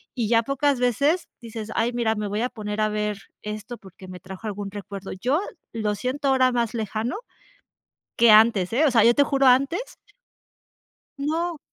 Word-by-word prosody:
y 230 -5 -1
ya 230 -1 +4
pocas 275 +1 0
veces 280 - +1
dices: 225 -2 -7
"Ay, 230 +1 +1
mira, 230 -2 0
me 210 -1 -3
voy 205 +2 -2
a 250 - 0
poner 210 -2 -4
a 215 - +3
ver 210 -1 -2 0.3
esto 215 +3 -6
porque, 190 -2 -14
me 185 0 -9
trajo 190 +4 -8
algún 205 -1 -5
recuerdo", 200 -1 -7
yo 255 - 0 0.3
lo 215 -2 -1
siento 260 +6 -2
ahora 260 -1 +4
más 235 -2 0
lejano 220 - -2 1.0
que 235 -1 +6
antes, 215 -4 +5
eh, 285 +7 +3
o 290 - +3
sea, 230 -3 +5
yo 235 +1 +5
te 285 - +5
juro 275 -1 +2
antes 275 - +2 1.2
No. 320 +3 -2
230 Hz, 180 wpm, -24 LUFS, 210-265 Hz, 1.2 s, que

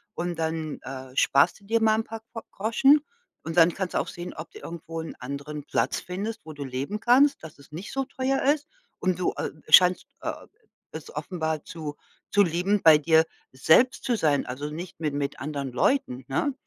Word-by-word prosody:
und 175 -1 -3
dann, 160 -1 -3
äh, 130 0 -8
sparst 140 +8 +3
du - - -21
dir 225 +2 +1
mal 220 0 +3
paar 225 0 -7
Ko 225 - -5
Groschen 270 +8 +4 0.4
und 165 +1 -5
dann 170 0 +6
kannst 190 -2 -3
du - - +3
auch - - -2
sehen, 175 +1 -7
ob 160 - -8
du - - -11
irgendwo 165 -1 -7
'n 160 - -8
anderen 140 +3 -6
Platz - - 0
findest, 205 +4 -5
wo 155 - -8
du 145 -1 -6
leben 135 +11 -4
kannst, 270 +5 +4
dass 160 -2 -10
es 140 +1 -18
nicht 175 +6 -7
so 270 0 0
teuer 265 0 -1
ist 290 +2 +2 0.3
und 185 -2 0
du, 180 - 0
äh, - - -2 0.2
scheinst, 180 0 +7 0.2
äh, - - -2 0.6
es - - -8
offenbar 160 -4 -3
zu 155 -3 -7 0.4
zu 205 - +5
lieben, 180 +4 +1
bei 160 -2 +9
dir 160 +1 +4 0.3
selbst 160 - +4
zu 245 - +1
sein, 150 -7 +2
also 140 +4 -4
nicht 170 +3 -8
mi 155 -2 0
mit 140 0 -3
anderen 140 -1 -4
Leuten, 130 - 0
ne, 205 - 0
165 Hz, 200 wpm, -26 LUFS, 150-215 Hz, 0.6 s, bei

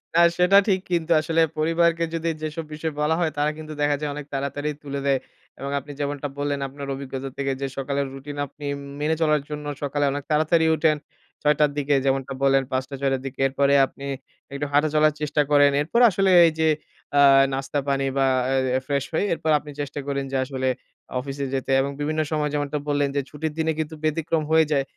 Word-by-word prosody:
না - - +5 0.2
সেটা 180 +2 +5
ঠিক 190 -2 +3
কিন্তু 170 -1 0
আসলে 165 +1 +1 0.2
পরিবারকে 165 +1 +2
যদি 165 0 -1
যেসব 155 +1 -4
বিষয় 155 0 -3
বলা 155 +2 +2
হয় 160 -3 +1
তারা 150 +1 +2
কিন্তু 155 -1 -8
দেখা 145 0 +3
যায় 150 - -2
অনেক 150 -1 -6
তাড়াতাড়ি 140 +2 -2
তুলে 140 -1 -4
দেয়। 135 -1 +3 0.4
এবং 140 +1 -4
আপনি 145 +2 -11
যেমনটা 145 0 -2
বললেন 145 0 -1
আপনার 140 +1 -8
অভিজ্ঞতা 135 0 -6
থেকে 135 -1 -1
যে 135 - -1
সকালের 140 0 -1
রুটিন 145 +2 -8
আপনি 145 +2 -11
উম - - -9 0.2
মেনে 160 +2 +1
চলার 150 -2 +3
জন্য 150 0 -5 0.2
সকালে 145 0 0
অনেক 145 0 -4
তাড়াতাড়ি 160 +2 +3
উঠেন। 155 -1 +2 0.4
৬ঃ০০ 150 0 +4
র - - -8
দিকে 145 0 +1
যেমনটা 135 0 0
বললেন 135 0 +4
৫ঃ০০-৬ঃ০০ 135 +1 -1
র - - -15
দিকে। 135 - -7
এরপরে 140 +1 +2
আপনি 140 +1 -11 0.5
একটু 140 +1 -2
হাঁটা 145 +2 +3
চলার 155 0 +4
চেষ্টা 150 0 +1
করেন। 145 -1 +6
এরপর 205 +11 0
আসলে 195 0 +2 0.2
এই 165 - +2
যে 160 - +3 0.5
আ - - +7 0.3
নাস্তা 135 +2 -2
পানি 135 0 +1
বা 135 - +3 0.5
এ - - 0
ফ্রেশ 140 -2 0
হয়ে 160 - +1
এরপর 160 -1 -1
আপনি 150 0 -11
চেষ্টা 145 0 -4
করেন 140 -1 -1
যে 135 - 0
আসলে 130 -1 -3 0.5
অফিসে 140 +1 -4
যেতে 135 0 -2
এবং 140 +1 -2
বিভিন্ন 155 +2 0
সময় 150 -1 0
যেমনটা 145 0 -1
বললেন, 145 -1 +1
যে 140 - +2
ছুটির 150 +1 -4
দিনে 160 0 +1
কিন্তু 160 0 -3
ব্যতিক্রম 155 0 0
হয়ে 160 0 +5
যায়। 140 -2 +2
145 Hz, 200 wpm, -24 LUFS, 140-155 Hz, 0.5 s, আ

